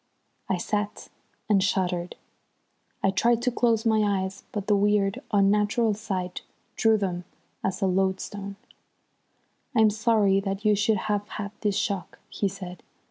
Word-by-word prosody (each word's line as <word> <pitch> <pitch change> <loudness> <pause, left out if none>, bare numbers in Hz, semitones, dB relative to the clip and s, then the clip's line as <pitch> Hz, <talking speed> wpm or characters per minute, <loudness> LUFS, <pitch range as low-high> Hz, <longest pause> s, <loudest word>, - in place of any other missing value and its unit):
I 190 - +1
sat 205 +3 -3 0.4
and 205 -3 +4
shuddered. 180 -3 0 0.9
I 195 - +4
tried 235 +5 +2
to 250 - +2
close 230 -2 +1
my 220 -1 +3 0.2
eyes, 190 +1 -7
but 205 -2 -3
the 210 - +3
weird, 200 -1 +2
unnatural 210 +3 +3
sight 190 -4 -4 0.3
drew 225 -1 +4
them 180 -3 -2 0.4
as 190 0 -1
a - - +4
lodestone. 195 +1 -1 1.2
"I'm 220 -2 +5
sorry 215 -2 +3
that 195 +1 -4
you 210 - +5
should 210 +1 +2
have 205 -1 -1
had 205 -1 -4
this 205 -2 +1
shock," 195 -2 -2
he 200 - -1
said. 185 -3 -7
200 Hz, 140 wpm, -26 LUFS, 195-215 Hz, 1.2 s, I'm